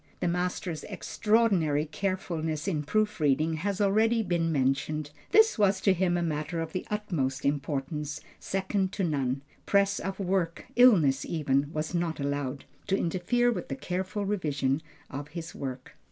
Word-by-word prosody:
The - - 0
master's 180 -2 -2
extraordinary 195 -7 +1
carefulness 165 -2 -2
in 160 -6 0
proof 210 +7 0
reading 155 +2 +2
has 200 +4 -2
already 220 +3 +3
been 170 -3 0
mentioned. 145 +2 0 0.2
This 440 - +5
was 200 -1 +4
to 195 - +4
him 175 -1 +1
a 175 - 0
matter 155 0 -2
of 165 -1 -3
the 185 - -4
utmost 165 -11 -2
importance, 145 +1 -2 0.2
second 190 0 -1
to 205 - -1
none. 135 -5 0 0.2
Press 200 0 +3
of 195 +1 -4
work, 180 -3 -1
illness 170 - +6
even, 140 -2 0
was 155 +1 -3
not 170 -2 -1
allowed 140 -1 -2 0.2
to 195 -1 +2
interfere 220 +9 +1
with - - -4
the 135 - -3
careful 185 +7 -3
revision 150 -8 0 0.3
of 145 +1 -5
his 165 +2 -7
work. 130 -2 -6
170 Hz, 155 wpm, -28 LUFS, 145-195 Hz, 0.3 s, illness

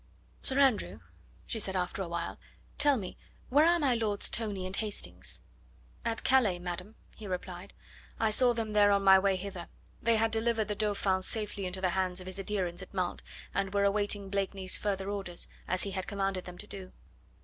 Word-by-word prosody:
"Sir 265 - +6
Andrew," 270 -6 +3 0.5
she 225 - -4
said 195 -2 -1
after 180 +1 -1
a 190 - -3
while, 170 0 -4 0.4
"tell 290 -2 +5
me, 190 -5 -6 0.3
where 295 +5 +5
are 345 0 +5
my 285 -6 +2
Lords 215 -3 0
Tony 205 -5 -2
and 185 +1 -4
Hastings?" 90 - -2 0.6
"At 225 -1 -2
Calais, 240 -9 +4
madam," 180 +4 -6 0.2
he 215 - -9
replied. 180 0 -6 0.4
"I 220 -1 +2
saw 245 +3 +6
them 225 -2 -3
there 205 -1 +6
on 200 0 +3
my 190 0 +8
way 195 0 +2
hither. 185 -2 -6 0.3
They 230 0 +3
had 225 0 +2
delivered 225 -1 +1
the - - +1
Dauphin 200 -3 +1
safely 205 -1 -3
into 185 +1 -4
the 185 - +2
hands 185 0 0
of 185 - -9
his 185 +1 -5
adherents 190 -3 -2
at - - -11
Mantes, 180 -2 -2 0.3
and 195 0 -1
were 200 - +3
awaiting 200 -1 +1
Blakeney's 195 -1 +1
further 195 -2 -2
orders, 195 -4 -3 0.2
as 185 0 +1
he 200 - -3
had 190 -1 -4
commanded 195 -2 -2
them 180 -1 -9
to 210 - -7
do." 195 -3 -9
200 Hz, 195 wpm, -31 LUFS, 185-215 Hz, 0.6 s, my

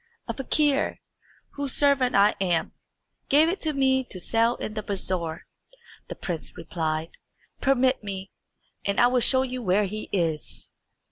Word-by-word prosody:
"A 230 - -2
fakir, 285 +3 0 0.5
whose 280 -2 -3
servant 280 -3 +3
I 200 +1 +5
am, 175 -4 0 0.6
gave 305 +4 +5
it 380 - -3
to 315 - 0
me 265 -2 +2
to 185 - -8
sell 230 +6 +2
in 215 - -5
the 215 - -3
bazaar," 185 -5 -1 0.6
the - - -6
prince 170 -4 -5
replied. 160 -1 -3 0.5
"Permit 260 -2 +2
me, 195 -1 -6 0.5
and 200 0 0
I - - +7
will 250 +1 +3
show 260 +2 +4
you 255 -1 -4
where 205 0 +2
he 215 +2 -6
is." 165 -5 -2
225 Hz, 150 wpm, -26 LUFS, 185-265 Hz, 0.6 s, I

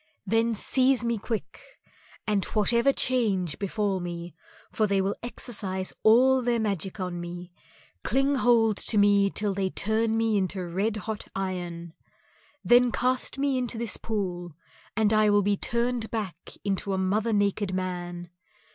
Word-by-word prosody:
Then 225 +3 +1
seize 260 +3 +2
me 235 -2 -1
quick, 220 0 -5 0.6
and 205 -3 +1
whatever 235 +5 +3
change 205 - +1
befall 200 -1 -1
me, 175 -1 -6 0.4
for 215 - +1
they 200 -1 +1
will 195 +1 0
exercise 200 -6 -3
all 255 +4 +5
their 240 -1 +1
magic 200 -3 -3
on 180 -2 -3
me, 175 +1 -7 0.5
cling 270 +1 +1
hold 225 -4 +3
to 220 - 0
me 200 -1 +4
till 205 0 -2
they 190 -1 -1
turn 220 +3 0
me 225 -2 +2
into 190 -1 -2
red 200 +6 -1
hot 220 -2 -4
iron. 175 -3 -4 0.7
Then 245 0 +5
cast 255 +2 0
me 275 -1 +1
into 245 -2 -3
this 230 -2 -2
pool 180 -6 -4 0.4
and 220 -1 +3
I 215 0 +4
will 205 0 +4
be 205 +1 +2
turned 235 +2 -1
back 195 -7 -5
into 195 0 -1
a - - 0
mother 205 +4 0
naked 205 -1 +1
man. 175 -2 -4
205 Hz, 150 wpm, -27 LUFS, 185-230 Hz, 0.7 s, all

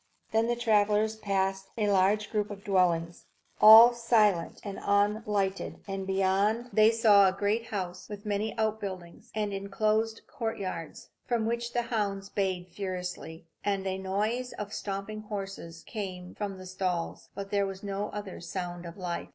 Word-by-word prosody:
Then 225 +1 +2
the 240 - +1
travellers 215 -2 +2
passed 195 -2 -1
a 210 -2 +1
larger 200 +2 +3
group 210 -1 0
of 200 -1 -8
dwellings, 175 -4 +1 0.4
all 225 +3 +11
silent 215 -7 +2
and 200 -2 -6
unlighted; 205 -1 0
and 195 -1 -4
beyond, 195 +5 +1
they 215 0 +6
saw 215 -3 +6
a - - +3
great 205 +4 -1
house, 185 -3 -5
with 205 0 -8
many 210 +2 -2
outbuildings 200 -6 -3
and 210 -2 -1
enclosed 215 +3 0
courtyards, 195 - -5 0.2
from 235 -3 +1
which 235 +1 -2
the 240 - +1
hounds 200 -4 -2
bayed 185 -3 -2
furiously, 180 -3 -5 0.2
and 200 -1 -1
a 190 0 -2
noise 215 +6 -1
of 210 0 -6
stamping 200 +2 -4
horses 195 -5 -7
came 185 -4 -6
from 200 -2 -4
the 185 - -10
stalls. 185 -2 -3
But 195 0 -6
there 200 -1 +2
was 195 0 -7
no 200 +1 -3
other 205 -4 -7
sound 175 -1 -5
of 170 - -10
life. 175 -2 -4
200 Hz, 155 wpm, -29 LUFS, 190-215 Hz, 0.4 s, all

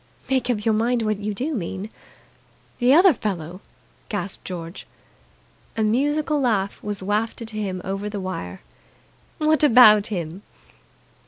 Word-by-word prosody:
"Make 260 -2 +1
up 210 -4 -1
your 225 - +3
mind 230 +2 +1
what 215 -2 -1
you 210 0 -3
do 275 +9 -3
mean." 195 -1 -5 0.9
"The 245 +1 +4
other 350 +4 +7
fellow!" 185 - -5 0.5
gasped 200 -2 -4
George. 170 0 -7 0.9
A 220 - +1
musical 290 +6 +1
laugh 205 -6 0
was 205 -2 -4
wafted 220 +3 -2
to 215 -1 -4
him 185 -3 -4
over 195 +2 -3
the 205 -1 -5
wire. 165 - -6 0.8
"What 310 -1 +2
about 220 -6 +7
him?" 175 -3 -5
210 Hz, 140 wpm, -23 LUFS, 195-245 Hz, 0.9 s, other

